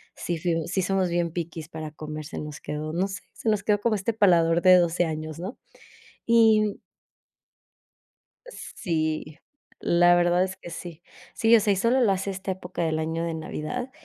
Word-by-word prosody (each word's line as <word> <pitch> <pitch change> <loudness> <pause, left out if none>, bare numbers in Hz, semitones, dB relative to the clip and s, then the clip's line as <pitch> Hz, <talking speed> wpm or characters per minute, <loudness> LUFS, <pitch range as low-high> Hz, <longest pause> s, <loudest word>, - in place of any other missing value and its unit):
sí 170 -1 -3
fu 165 -2 -1
sí 190 +2 0
somos 190 0 0
bien 170 -1 0
piquis 165 -2 -5
para 155 -2 -7
comer, 155 0 -7
se - - -7
nos 150 -1 -7
quedó, 155 +1 -5
no 185 +3 0
sé, 195 - -6
se 225 - -2
nos 215 -2 +1
quedó 205 -1 +1
como 230 -1 +1
este 205 +3 -1
paladar 170 -5 +4
de 185 0 +7
12 175 0 +2
años, 155 0 -5
¿no? 190 +8 -6 0.7
Y 220 -3 +4 1.7
sí, 155 - -4 0.4
la 175 0 +4
verdad 175 +1 +3
es 190 0 -4
que - - -10
sí. 170 -1 -8 0.3
Sí, 225 +1 +4
o - - +6
sea, 205 -1 +2
y - - -1
solo 235 +7 +2
lo 220 - +4
hace 195 +1 -1
esta 190 0 -4
época 180 -1 -5
del 160 -1 0
año 160 +1 -2
de 170 - -2
Navidad 160 +11 -5
175 Hz, 185 wpm, -25 LUFS, 160-200 Hz, 1.7 s, de